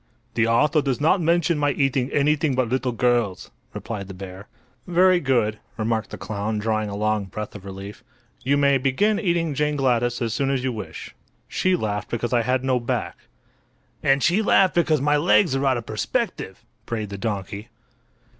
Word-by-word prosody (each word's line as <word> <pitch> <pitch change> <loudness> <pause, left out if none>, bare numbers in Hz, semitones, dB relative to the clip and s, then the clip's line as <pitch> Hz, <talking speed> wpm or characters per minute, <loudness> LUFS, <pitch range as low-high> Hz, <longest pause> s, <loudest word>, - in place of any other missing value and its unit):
"The 115 0 +2
author 150 +7 +3
does 135 -3 -1
not 165 +5 +3
mention 170 -1 +2
my 145 -1 +2
eating 135 -2 0
anything 145 0 +2
but 130 -2 +1
little 130 +1 -1
girls," 120 -5 0 0.2
replied 100 -4 -6
the 95 - -9
bear. 95 +1 -9 0.4
"Very 180 +1 +4
good," 120 -7 +1 0.2
remarked 110 0 -1
the - - -7
clown, 105 +1 -3
drawing 110 0 -1
a 100 - -5
long 105 0 0
breath 105 +2 -6
of 100 -2 -10
relief. 100 +1 -9 0.4
"you 140 +2 +2
may 140 -1 +3
begin 200 - +1
eating 170 -6 0
Jane 150 +1 0
Gladys 120 -3 +1
as 115 -3 -1
soon 135 +4 0
as 135 -2 0
you 130 - 0
wish. 110 - -8 0.3
She 185 0 +1
laughed 105 - -3
because 120 +1 -2
I 120 - +4
had 125 +2 0
no 130 -1 +1
back." 120 - -3 0.9
"And 135 0 +2
she 180 +6 +3
laughed 195 -3 +4
because 160 -4 +2
my 145 +1 +3
legs 165 0 +3
are 135 +1 +1
out 130 -2 +2
of 115 - -6
perspective," 110 - -3 0.2
brayed 110 -3 -3
the 100 -1 -7
donkey. 100 0 -4
125 Hz, 185 wpm, -23 LUFS, 110-145 Hz, 0.9 s, Very